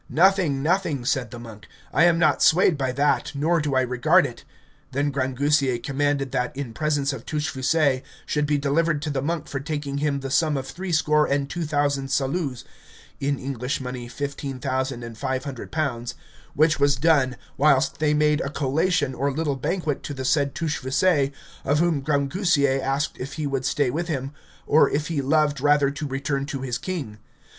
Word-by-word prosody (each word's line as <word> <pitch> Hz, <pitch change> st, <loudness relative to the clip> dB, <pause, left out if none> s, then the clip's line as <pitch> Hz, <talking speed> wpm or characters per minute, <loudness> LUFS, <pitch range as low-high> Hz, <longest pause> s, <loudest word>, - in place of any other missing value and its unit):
Nothing, 175 Hz, -6 st, +3 dB
nothing, 160 Hz, -6 st, 0 dB
said 130 Hz, -3 st, 0 dB
the 120 Hz, -, -9 dB
monk; 110 Hz, -2 st, -11 dB, 0.3 s
I 165 Hz, -, +5 dB
am 170 Hz, -1 st, +4 dB
not 155 Hz, -3 st, +3 dB
swayed 175 Hz, 0 st, +5 dB
by 135 Hz, -3 st, -1 dB
that, 145 Hz, +2 st, +1 dB
nor 160 Hz, +4 st, +1 dB
do 145 Hz, -2 st, -1 dB
I 130 Hz, -, +4 dB
regard 135 Hz, +8 st, +3 dB
it. 125 Hz, -4 st, -7 dB, 0.5 s
Then 140 Hz, +2 st, 0 dB
Grangousier 135 Hz, 0 st, +1 dB
commanded 140 Hz, +1 st, -1 dB
that, 125 Hz, +1 st, -2 dB
in 135 Hz, -5 st, -5 dB
presence 145 Hz, +1 st, 0 dB
of 125 Hz, -4 st, -7 dB
Touchfaucet, 150 Hz, -2 st, 0 dB, 0.2 s
should 150 Hz, -1 st, 0 dB
be 150 Hz, 0 st, +2 dB
delivered 145 Hz, +2 st, +1 dB
to 150 Hz, -, -2 dB
the 135 Hz, -2 st, -1 dB
monk 160 Hz, +1 st, -2 dB
for 135 Hz, -, -4 dB
taking 145 Hz, -1 st, -3 dB
him 145 Hz, -2 st, 0 dB
the 135 Hz, -1 st, -5 dB
sum 155 Hz, 0 st, +2 dB
of 135 Hz, -, -4 dB
three 185 Hz, +5 st, -5 dB
score 150 Hz, -1 st, +3 dB
and 140 Hz, 0 st, 0 dB
two 170 Hz, +3 st, -3 dB
thousand 145 Hz, -2 st, 0 dB
saluts 135 Hz, -1 st, -1 dB, 0.6 s
(in 140 Hz, 0 st, 0 dB
English 130 Hz, +2 st, -3 dB
money, 125 Hz, -2 st, -6 dB
fifteen 140 Hz, +1 st, -5 dB
thousand 130 Hz, -1 st, -2 dB
and 115 Hz, -1 st, -9 dB
five 130 Hz, 0 st, -2 dB
hundred 135 Hz, -4 st, -7 dB
pounds), 125 Hz, -7 st, -2 dB, 0.4 s
which 155 Hz, 0 st, +3 dB
was 140 Hz, 0 st, +4 dB
done, 140 Hz, -3 st, +2 dB, 0.2 s
whilst 140 Hz, -2 st, +3 dB
they 150 Hz, -1 st, +2 dB
made 150 Hz, +1 st, +2 dB
a 140 Hz, -, -2 dB
collation 145 Hz, +1 st, 0 dB
or 140 Hz, +3 st, -1 dB
little 145 Hz, 0 st, -1 dB
banquet 150 Hz, +2 st, -2 dB
to 145 Hz, -, -6 dB
the 130 Hz, -1 st, -5 dB
said 140 Hz, 0 st, +1 dB
Touchfaucet, 145 Hz, -1 st, +1 dB, 0.3 s
of 145 Hz, +2 st, +1 dB
whom 165 Hz, -3 st, +2 dB
Grangousier 140 Hz, -1 st, +1 dB
asked 135 Hz, +2 st, -1 dB
if 135 Hz, +3 st, -5 dB
he 155 Hz, -, -3 dB
would 135 Hz, -2 st, -2 dB
stay 135 Hz, -2 st, +1 dB
with 170 Hz, +4 st, -2 dB
him, 135 Hz, -4 st, -3 dB, 0.3 s
or 155 Hz, -, +5 dB
if 150 Hz, +2 st, -2 dB
he 155 Hz, -4 st, -1 dB
loved 145 Hz, 0 st, +1 dB
rather 145 Hz, -1 st, +3 dB
to 145 Hz, +1 st, -5 dB
return 140 Hz, +1 st, -2 dB
to 135 Hz, -2 st, -4 dB
his 125 Hz, -2 st, -2 dB
king. 145 Hz, -, -5 dB
140 Hz, 185 wpm, -24 LUFS, 135-155 Hz, 0.6 s, I